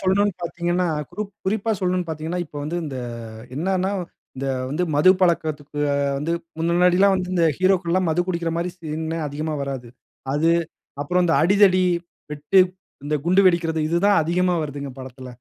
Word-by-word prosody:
சொல்லணும்ன்னு 195 +1 +2
பார்த்தீங்கன்னா, 175 +1 -1 0.2
குருப் 210 -1 -5
குறிப்பா 215 +3 0
சொல்லணும்ன்னு 180 -2 -1
பார்த்தீங்கன்னா, 160 +3 -3
இப்ப 150 - -12
வந்து 165 +3 -3
இந்த 140 -4 -5 0.6
என்னன்னா 185 +4 0 0.5
இந்த 135 +1 -3 0.2
வந்து 160 +6 0
மது 150 +6 +6
பழக்கத்துக்கு 155 -5 0 0.4
வந்து 150 +4 -2 0.3
முன்னாடிலாம் 180 +3 +4
வந்து 185 -1 -2
இந்த 170 -2 +3
ஹீரோக்கள் 185 -2 +2
எல்லாம் 185 -2 +2
மது 160 - +1
குடிக்கிற 170 -2 -1
மாரி 175 +1 -1
சீன் 160 -1 -5 0.2
அதிகமா 155 +2 -3
வராது. 135 -3 -5 0.4
அது, 160 +4 +2 0.5
அப்புறம் 180 +4 +1
இந்த 165 - +2
'அடிதடி, 185 +1 +5 0.5
வெட்டு, 150 +6 +3 0.4
இந்த 150 +1 -1
குண்டு 185 +3 +5
வெடிக்கிறது' 165 -3 0
இதுதான் 200 +5 +3
அதிகமா 180 +2 +1
வருதுங்க, 140 -2 -6
படத்தில. 130 0 -9
170 Hz, 150 wpm, -22 LUFS, 155-185 Hz, 0.6 s, மது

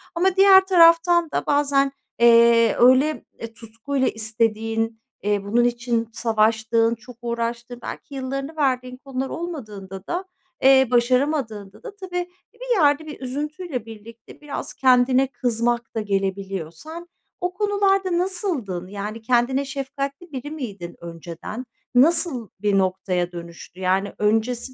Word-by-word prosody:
ama 365 +2 +2
diğer 385 -1 +7
taraftan 340 -2 +5
da - - -2
bazen, 280 -1 +2 0.3
eee, 235 -1 +6
öyle, 260 +5 +4
eee, 230 0 -7
tutkuyla 230 +4 -3
istediğin, 225 0 -1 0.2
eee, 205 -1 0
bunun 230 +4 +2
için 240 -1 -1
savaştığın, 225 0 +1
çok 230 +2 -14
uğraştığın 235 0 -4
belki 280 - -8
yıllarını 275 +3 -4
verdiğin 255 -3 -1
konular 265 0 -5
olmadığında 210 - -7
da, 355 +2 -3 0.4
eee, 265 -1 +6
başaramadığında 245 - 0
da 455 -4 -9
tabii 360 -3 -4 0.2
bir - - -2
yerde 290 +1 +3
bir 300 -1 -9
üzüntüyle 290 - -4
birlikte 225 +2 -13
biraz 295 -1 -6
kendine 255 0 +4
kızmak 240 -2 -2
da 220 - 0
gelebiliyor. 195 -4 -2
Sen 330 - -10 0.3
o 360 0 -2
konularda 390 -2 +1
nasıldın? 340 - -2
Yani, 205 +3 -6
kendine 250 +3 +1
şefkatli 275 +4 -5
biri 275 +1 -6
miydin 205 - -7
önceden? 170 +7 -8 0.3
Nasıl 270 - +3
bir 205 -1 +1
noktaya 185 -2 0
dönüştü? 170 +1 -10
Yani, 190 +2 0
öncesi 225 +4 0
245 Hz, 125 wpm, -22 LUFS, 220-295 Hz, 0.4 s, diğer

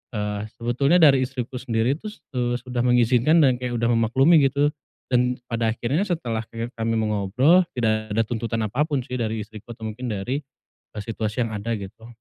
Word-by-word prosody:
eee, 105 0 -3
sebetulnya 125 +7 +1
dari 140 -3 +7
istriku 125 -1 -5
sendiri 120 +2 0
itu, 215 - -7 0.2
eee, 120 -1 0
sudah 125 0 -4
mengizinkan 125 +6 +4
dan 130 -3 +4
kayak 125 -1 -3
udah 115 0 +1
memaklumi 130 +8 +4
gitu. 140 +2 +1 0.4
Dan 125 0 +2
pada 115 -2 -1
akhirnya 130 +9 -1
setelah 125 - -2
ke 115 +1 -5
kami 115 0 0
mengobrol, 110 - +3 0.2
tidak 110 -2 0
ada 115 - +3
tuntutan 115 0 -2
apapun 140 +6 0
sih 125 0 -4
dari 110 -1 -2
istriku 110 +2 -11
atau 110 -1 -9
mungkin 125 +4 -6
dari, 115 +5 -2 0.5
eee, 105 - -5
situasi 110 +1 -2
yang 115 - -6
ada 110 +3 -3
gitu. 110 +3 -9
120 Hz, 175 wpm, -23 LUFS, 110-130 Hz, 0.5 s, dari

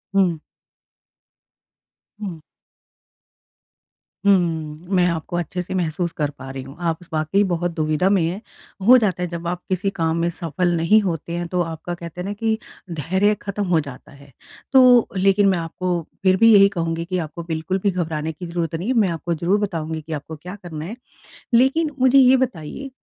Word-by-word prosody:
हुँ। 175 -5 +2 1.8
हुँ। 180 -7 -6 1.8
हुँ। 200 - +7 0.6
मैं 180 -1 +4
आपको 170 +1 -4
अच्छे 175 +1 -3
से 180 - -6
महसूस 170 0 -1
कर 150 -2 0
पा 135 0 -8
रही 135 0 -6
हूँ, 135 +2 -11
आप 165 -2 -1 0.2
वाक़ई 155 +6 +2
बहुत 175 -2 -1
दुविधा 155 +4 +1
में 195 -3 +3
हैं। 180 +6 -2 0.5
हो 255 +1 +9
जाता 195 -6 0
है - - -1
जब 170 0 -5
आप 180 0 -3
किसी 190 +2 0
काम 165 -3 -1
में 170 - +1
सफल 170 +1 -1
नहीं 210 +7 +4
होते 170 -3 -3
हैं 175 0 -3
तो 180 0 0
आपका 165 +1 -4
कहते 170 0 -7
हैं - - -5
ना 205 - -2
कि 220 +1 0 0.4
धैर्य 190 +7 +2
ख़त्म 200 0 -3
हो 170 -2 +3
जाता 140 -4 -8
है। 140 0 -16 0.4
तो 250 -3 +7
लेकिन 195 +1 +4
मैं 185 - +2
आपको 175 +1 -2 0.2
फिर 185 0 +4
भी 225 +1 +6
यही 200 -1 +7
कहूँगी 165 -3 -2
कि 185 +1 -2
आपको 165 0 -5
बिल्कुल 165 +3 -2
भी 200 - +3
घबराने 160 -3 -2
की 170 +3 -9
ज़रूरत 170 -1 -2
नहीं 180 +7 -4
है, - - +3
मैं 210 -6 +3
आपको 170 +1 -2
ज़रूर 175 +6 +1
बताऊँगी 160 -5 -3
कि 160 +1 -7
आपको 155 +2 -6
क्या 180 +6 -9
करना 155 -3 -6
है। 215 +7 -6 0.6
लेकिन 270 +6 +3
मुझे 260 +1 +5
ये 260 0 +7
बताइए, 255 - -3
175 Hz, 185 wpm, -21 LUFS, 160-200 Hz, 1.8 s, हो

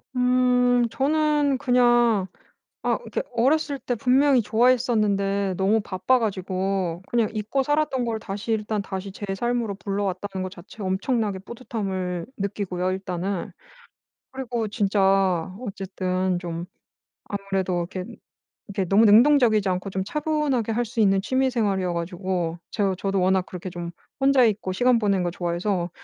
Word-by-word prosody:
음 250 -1 +3
저는 295 0 +2
그냥 240 -5 +3 0.6
아 - - +1
그니까 - - -4
어렸을 280 +4 +1
때 245 0 -2
분명히 260 +2 +3
좋아했었는데 210 -4 +2
너무 200 +4 +2
바빠가지고 190 -4 -1
그냥 235 -3 +1
잊고 220 +5 -1
살았던 290 -3 0
걸 230 -2 -2
다시 210 +1 -4
일단 215 -1 -1
다시 195 0 -5
제 205 - -9
삶으로 240 -1 -1
불러왔다는 195 -1 -3
거 185 - -4
자체 185 +4 -11
엄청나게 200 +2 -1
뿌듯함을 195 -6 -4
느끼고요 190 -2 -2
일단은. 185 0 -3 0.8
그리고 240 -4 -3
진짜 195 -4 +2
어쨌든 185 -4 -2
좀 170 -1 -5 0.6
아무래도 195 -2 -2 0.2
이렇게, 185 -1 -4 0.6
이렇게 200 -2 -2
너무 210 +3 +5
능동적이지 220 -2 +5
않고 185 +2 -2
좀 190 0 -2
차분하게 290 -3 -1
할 240 - +1
수 230 0 -6
있는 195 -2 +4
취미생활이어 220 -8 0
가지고 175 0 -2
제가 195 -3 0
저도 195 -1 -1
워낙 185 0 +2
그렇게 185 0 -7
좀 170 -1 -6 0.3
혼자 270 -1 +5
있고 205 -4 +1
시간 245 +3 +3
보내는 200 -4 +1
거 175 - -1
좋아해서 175 +1 -2
205 Hz, 325 characters per minute, -24 LUFS, 190-240 Hz, 0.8 s, 너무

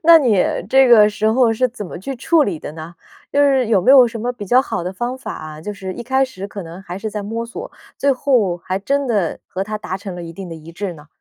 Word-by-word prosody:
那 335 0 +8
你 240 -8 +2 0.3
这 265 +1 +5
个 215 -3 +7
时 210 +1 -2
候 235 -1 +3
是 250 +3 +1
怎 225 -5 -7
么 175 - -8
去 270 +9 -5
处 315 +5 +3
理 190 - -2
的 150 - -7
呢？ 160 +2 -9 0.4
就 285 - +3
是 270 -4 +3
有 210 -4 +3
没 255 - +3
有 260 -3 +8
什 225 -1 -6
么 245 +2 -1
比 235 -4 -8
较 250 +6 +5
好 265 - -3
的 180 +2 -4
方 240 +6 -3
法 260 - -6
啊， 155 0 -8
就 210 +5 -5
是 190 -2 -6
一 240 - -6
开 265 +3 +2
始 200 -7 -7
可 200 -1 -7
能 170 +3 -10
还 180 0 -7
是 215 +1 -4
在 210 -1 -4
摸 225 +3 -4
索， 410 - -8 0.3
最 280 0 +2
后 245 -9 +1
还 185 +2 -3
真 280 +7 0
的 205 -8 0
和 190 - -4
他 215 +1 -4
达 190 -3 -4
成 195 -1 -7
了 175 - -7
一 165 - -8
定 185 +1 -8
的 165 - -7
一 160 +1 -11
致 190 0 -4
呢？ 150 -1 -15
215 Hz, 300 characters per minute, -19 LUFS, 185-255 Hz, 0.4 s, 那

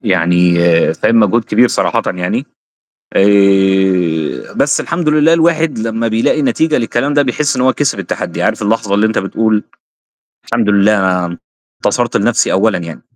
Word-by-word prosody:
يعني 90 -4 +1 0.4
فاهم؟ 115 +7 +2
مجهود 110 +2 +1
كبير 120 +4 +2
صراحةً - - -1
يعني. 90 0 -3 0.7
آآ، 95 -4 +1
بس - - +1
الحمد 170 -2 -3
لله، 150 +1 +3
الواحد 165 -4 +1
لمّا 115 +1 -2
بيلاقي 115 +7 0
نتيجة 155 +2 0
للكلام 120 +4 -2
ده 145 - +3
بيحس 140 +2 -1
إن 125 - -1
هو 130 0 +3
كِسِب 145 -1 -2
التحدي، - - -5
عارف - - -1
اللحظة 105 -1 -1
اللي 105 +2 +2
أنت 110 - -1
بتقول 105 +2 -1 0.8
الحمد 115 -2 -2
لله، 100 +1 +3
أنا 90 -2 -1 0.5
انتصرت - - 0
لنفسي - - +1
أولًا - - +1
يعني. 85 -2 -9
110 Hz, 150 wpm, -14 LUFS, 95-130 Hz, 0.8 s, لله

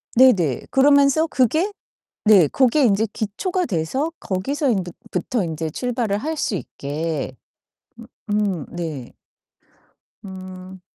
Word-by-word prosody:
네네. 195 - +4
그러면서 280 +3 +4
그게 315 - +1 0.5
네. 205 -7 +7
고게 265 - +3
인제 215 -1 +3
기초가 355 - -2
돼서 235 - -1
거기서 270 - -1
인 195 -6 +1
부 175 - -8 0.2
부터 200 +5 -1
인제 160 -1 -3
출발을 235 0 -1
할 315 +8 -3
수 235 - -1
있게. 145 -3 -4 0.9
음 205 -7 0
음 - - -15
네. 155 -8 -5 1.1
음 185 -1 -9
205 Hz, 210 characters per minute, -21 LUFS, 175-265 Hz, 1.1 s, 네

